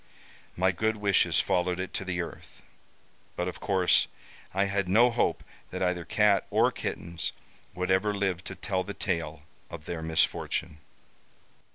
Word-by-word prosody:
My 95 +2 +3
good 110 +4 0
wishes 100 -2 +3
followed 90 0 +1
it 95 - -4
to - - -2
the 90 -2 -2
earth, - - -11 0.7
but 90 - -1
of 90 - -5
course, 95 -3 +3 0.4
I 100 +1 +2
had 100 -1 -1
no 120 +6 +6
hope 120 - 0 0.3
that - - -3
either 90 -2 0
cat 105 -2 +3
or - - +3
kittens 85 0 -4 0.4
would 90 0 -1
ever 95 +3 +3
live 95 -3 -1
to 95 - -5
tell 95 +1 -1
the 100 - -7
tale 80 -6 -2 0.3
of 80 -2 -9
their 85 -2 -4
misfortune. 80 -1 0
95 Hz, 155 wpm, -28 LUFS, 85-100 Hz, 0.7 s, no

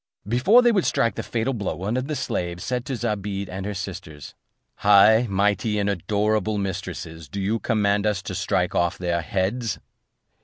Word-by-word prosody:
Before 175 - +5
they 240 - +5
would 195 -5 +1
strike 115 - +1
the - - -4
fatal 120 +3 -2
blow, 105 -5 -3
one 100 +6 -3
of 130 +1 -2
the 150 - -2
slaves 85 -8 -3
said 125 -1 -2
to 135 - -3
Zobeide, 105 -4 -3
and 95 +1 -5
her 105 - -4
sisters: 90 -7 -7 0.4
"High, 105 +4 +6
mighty, 100 +2 +1
and 100 -1 0
adorable 105 +2 0
mistresses, 90 -5 -5
do 100 - -5
you 105 +4 0
command 105 -2 +1
us 100 -3 -1
to - - -5
strike - - 0
off 85 0 +1
their 85 -1 -1
heads?" 100 +7 -1
100 Hz, 180 wpm, -24 LUFS, 95-115 Hz, 0.4 s, High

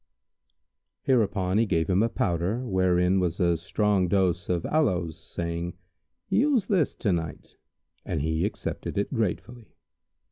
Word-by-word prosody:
Hereupon 105 -6 +2
he 115 - +2
gave 80 -4 +1
him 95 +2 +2
a 115 - +2
powder, 95 +6 -1
wherein 95 -2 +2
was 90 -1 -1
a 85 -2 +3
strong 100 +2 +1
dose 90 -2 +1
of 90 -2 0
aloes,[FN#151] 90 - +1
saying, 85 +2 -5 0.5
"Use 235 +3 +2
this 190 - +1
to 105 - 0
night;" 80 -3 -5 0.5
and - - -2
he 80 +1 0
accepted - - -4
it 100 - -1
gratefully. 115 +1 -3
95 Hz, 135 wpm, -26 LUFS, 85-115 Hz, 0.5 s, a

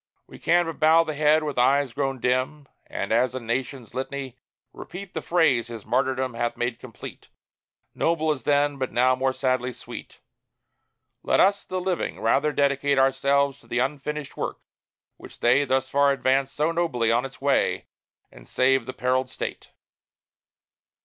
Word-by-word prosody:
We - - -14
can 175 +1 +3
but 165 - -6
bow 160 +1 +5
the 155 - -4
head, 155 +1 +3
with 145 -4 -2
eyes 135 0 +3
grown 135 0 -2
dim, 130 +4 -1 0.2
And, - - -4
as 125 0 +2
a - - -2
Nation's 125 +1 -4
litany, 135 -1 -5 0.4
repeat 185 +1 -9
The - - -3
phrase 140 -9 +2
his 115 -3 -9
martyrdom 130 +2 0
hath 120 0 -2
made 120 0 -2
complete, 120 -3 -10 0.7
Noble 160 -1 +1
as 135 -5 -4
then, 145 0 +1
but 130 - -2
now 130 +1 +3
more 130 +1 0
sadly 130 -1 -1
sweet; - - -10 1.0
"Let - - +1
us, 200 +1 +4
the 185 - -3
Living, 180 -1 -2
rather 140 +7 +2
dedicate 140 -1 +1
Ourselves 140 +1 +2
to - - -22
the 120 - -3
unfinished 145 +3 -3
work, - - -4 0.6
which - - -13
they 130 +4 +3
Thus 130 0 0
far 140 +1 +3
advanced 135 0 +1
so 155 +3 +1
nobly 135 -10 0
on 120 +2 +2
its 135 0 -8
way, 140 0 +1 0.5
And - - -15
save 130 -1 +2
the 130 - -5
perilled 130 +1 0
State! - - -6
135 Hz, 165 wpm, -25 LUFS, 130-150 Hz, 1.0 s, bow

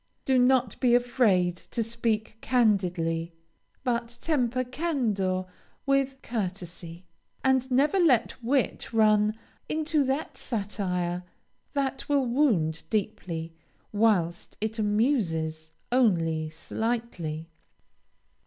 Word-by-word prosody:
Do 260 -1 +3
not 250 -3 +3
be 245 -2 +4
afraid 220 -8 +3
to 230 +5 -3
speak 225 -1 -2
candidly, 180 -8 +1 0.5
but 240 -2 -1
temper 255 -5 +1
candor 235 - -1 0.4
with 275 -1 +1
courtesy, 180 -5 -4 0.4
and 265 -1 +2
never 285 +9 +3
let 255 -7 +3
wit 260 +2 0
run 215 -1 +4 0.3
into 310 -1 +1
that 270 +4 -2
satire 185 -5 -2 0.5
that 275 -1 -2
will 280 -2 +3
wound 225 - +2
deeply, 170 -6 -2 0.4
whilst 200 -6 +1
it 220 +1 -2
amuses 195 - 0 0.2
only 165 -10 +2
slightly. 170 -3 -3
225 Hz, 95 wpm, -27 LUFS, 180-255 Hz, 0.5 s, be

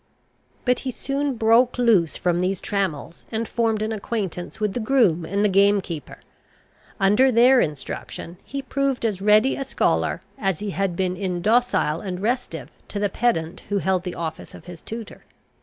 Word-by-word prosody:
But 250 -1 +2
he 265 - -4
soon 275 +2 -2
broke 230 +3 +4
loose 215 -10 +3
from 175 -1 +1
these 185 +1 0
trammels, 180 -5 -3
and 225 0 -2
formed 225 -2 0
an 220 - -2
acquaintance 200 -5 -4
with 210 -2 0
the - - -2
groom 215 -9 +2
and 200 +5 0
the - - +6
game 200 +1 +4
keeper. 165 -6 -7 0.8
Under 210 +7 +4
their 245 +2 +6
instruction 155 +3 -5
he 275 0 -5
proved 270 -2 -1
as 200 -4 -1
ready 215 +6 +4
a 275 - -3
scholar, 270 - 0 0.2
as 195 -6 0
he 205 +2 -4
had 195 -2 -1
been 185 0 -1
indocile 190 -2 +1
and 185 -3 -4
restive 240 +5 -2 0.2
to - - -6
the 205 0 +1
pedant 175 -10 0
who 205 - +1
held 190 -2 +1
the 180 -1 -5
office 160 -2 -6
of - - -13
his 175 -1 -10
tutor. 225 -1 -8
205 Hz, 175 wpm, -23 LUFS, 180-235 Hz, 0.8 s, the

